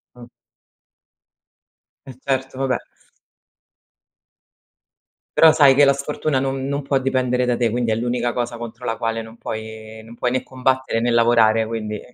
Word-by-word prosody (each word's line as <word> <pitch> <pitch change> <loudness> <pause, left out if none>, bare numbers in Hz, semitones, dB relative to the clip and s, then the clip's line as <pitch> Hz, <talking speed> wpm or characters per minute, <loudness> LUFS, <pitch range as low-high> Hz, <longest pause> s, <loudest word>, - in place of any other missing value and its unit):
Mh. 120 -1 -13 1.8
Eh 130 -2 -11
certo, 130 -1 -2
va 135 - 0
beh. 125 -2 -3 2.5
Però 160 -1 +7
sai 140 -3 +6
che 145 - +7
la 140 - +5
sfortuna 140 0 -2
non 135 0 -2
non 140 +1 -2
può 135 0 +1
dipendere 130 -1 0
da 120 -1 +1
te, 120 -2 +1
quindi 120 -1 -1
è - - +3
l'unica 120 +1 -1
cosa 120 -1 -3
contro 120 +1 -9
la 115 -1 -2
quale 115 -1 -2
non 110 +1 -13
puoi 110 0 -8
non 115 +1 -13
puoi 125 0 -1
né 130 - 0
combattere 130 -2 -1
né 120 +1 +1
lavorare 115 -1 +4
quindi 110 -2 -4
120 Hz, 160 wpm, -21 LUFS, 115-130 Hz, 2.5 s, Però